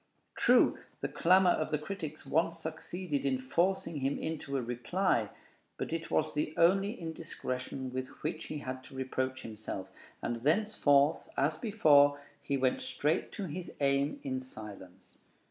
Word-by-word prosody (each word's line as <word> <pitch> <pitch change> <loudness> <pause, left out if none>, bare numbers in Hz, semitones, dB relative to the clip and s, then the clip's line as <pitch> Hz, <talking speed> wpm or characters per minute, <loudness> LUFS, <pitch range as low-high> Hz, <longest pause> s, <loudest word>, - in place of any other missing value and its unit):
True, - - +5 0.2
the - - 0
clamor 185 +1 +5
of 155 - 0
the 150 - +1
critics 155 -2 -6
once 165 +4 +1
succeeded 160 -1 -3
in 135 -2 +1
forcing 170 +6 0
him 135 0 0
into 150 -3 -3
a - - 0
reply; 120 - 0 0.5
but - - -3
it 165 0 -3
was 155 - +1
the 150 +1 -1
only 195 +6 +3
indiscretion 130 -6 -5
with 130 0 -2 0.2
which 155 +1 -2
he 155 - -5
had 130 -2 -5
to - - -13
reproach 130 0 -2
himself, 105 -3 -6 0.3
and 120 - -1
thenceforth, 150 - +3
as 150 +3 +2
before, 145 -9 +5 0.2
he 140 - -1
went 130 -1 +1
straight 150 +2 0
to 205 - -4
his 175 +2 -5
aim 140 0 +1
in 130 -2 -2
silence. 100 -7 -10
145 Hz, 150 wpm, -32 LUFS, 130-165 Hz, 0.5 s, True